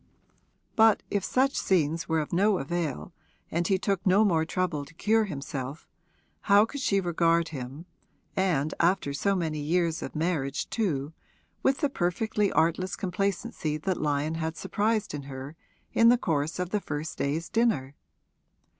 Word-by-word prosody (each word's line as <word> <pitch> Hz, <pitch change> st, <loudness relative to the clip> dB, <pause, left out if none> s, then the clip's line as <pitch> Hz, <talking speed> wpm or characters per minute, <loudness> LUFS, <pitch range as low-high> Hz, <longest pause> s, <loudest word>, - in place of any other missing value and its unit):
But 220 Hz, -1 st, +5 dB
if 200 Hz, -2 st, 0 dB
such 270 Hz, +5 st, +2 dB
scenes 165 Hz, -3 st, +1 dB
were 160 Hz, -1 st, +2 dB
of 150 Hz, -, -6 dB
no 200 Hz, +3 st, +3 dB
avail 150 Hz, -, -3 dB, 0.4 s
and 170 Hz, +1 st, 0 dB
he 190 Hz, -, +3 dB
took 195 Hz, -1 st, -1 dB
no 200 Hz, +3 st, +4 dB
more 165 Hz, -5 st, +2 dB
trouble 170 Hz, -4 st, -1 dB
to 160 Hz, +3 st, -15 dB
cure 220 Hz, +4 st, +2 dB
himself, 140 Hz, -4 st, -6 dB, 0.6 s
how 200 Hz, +1 st, +7 dB
could 285 Hz, +4 st, -6 dB
she 200 Hz, -6 st, +2 dB
regard 170 Hz, -2 st, +2 dB
him, 135 Hz, +2 st, -7 dB, 0.5 s
and 160 Hz, -6 st, +1 dB
after 170 Hz, -4 st, +2 dB
so 200 Hz, +7 st, +1 dB
many 160 Hz, -4 st, -1 dB
years 165 Hz, +2 st, 0 dB
of -, -, -6 dB
marriage 150 Hz, -4 st, -1 dB
too, 155 Hz, -9 st, -1 dB, 0.5 s
with 270 Hz, +3 st, +1 dB
the 290 Hz, -, +3 dB
perfectly 205 Hz, +2 st, 0 dB
artless 180 Hz, +3 st, +1 dB
complacency 190 Hz, -4 st, -2 dB
that 185 Hz, +4 st, -2 dB
Lyon 150 Hz, +1 st, 0 dB
had 160 Hz, 0 st, -3 dB
surprised 215 Hz, -1 st, 0 dB
in 145 Hz, -, -4 dB
her 135 Hz, +3 st, -7 dB, 0.4 s
in 230 Hz, 0 st, +6 dB
the 245 Hz, -, +6 dB
course 155 Hz, -7 st, -1 dB
of 180 Hz, 0 st, -3 dB
the 210 Hz, -, 0 dB
first 150 Hz, -1 st, -5 dB
day's 155 Hz, +4 st, -1 dB
dinner? 220 Hz, -, +1 dB
170 Hz, 155 wpm, -28 LUFS, 150-200 Hz, 0.6 s, how